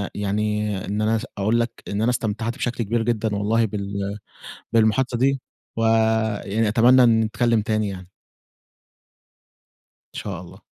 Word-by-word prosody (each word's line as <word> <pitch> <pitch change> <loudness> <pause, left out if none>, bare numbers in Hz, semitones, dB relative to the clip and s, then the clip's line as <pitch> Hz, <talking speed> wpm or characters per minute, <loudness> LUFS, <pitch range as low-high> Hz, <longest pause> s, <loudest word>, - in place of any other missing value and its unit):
يعني 105 0 -1
إن 105 +2 -2
أنا 110 +1 +2
اس 110 +3 -2
اقول 110 +4 +1
لك 115 0 0 0.2
إن 100 +1 -2
أنا 115 - +2
استمتعت 115 -1 -2
بشكل 120 -1 -2
كبير 115 +2 0
جدًا 110 -2 -1
والله 110 +3 +1
بال 100 -1 -4 0.6
بالمحادثة 115 +2 +2
دي 135 +2 +2 0.4
ويعني 110 -1 +1
أتمنى 125 +4 +5 0.2
نتكلم 115 0 +1
تاني 110 -1 0
يعني. 90 -2 -8 2.0
إن - - -4
شاء 95 -4 -5
الله. 90 - -13
110 Hz, 135 wpm, -23 LUFS, 105-115 Hz, 2.0 s, أتمنى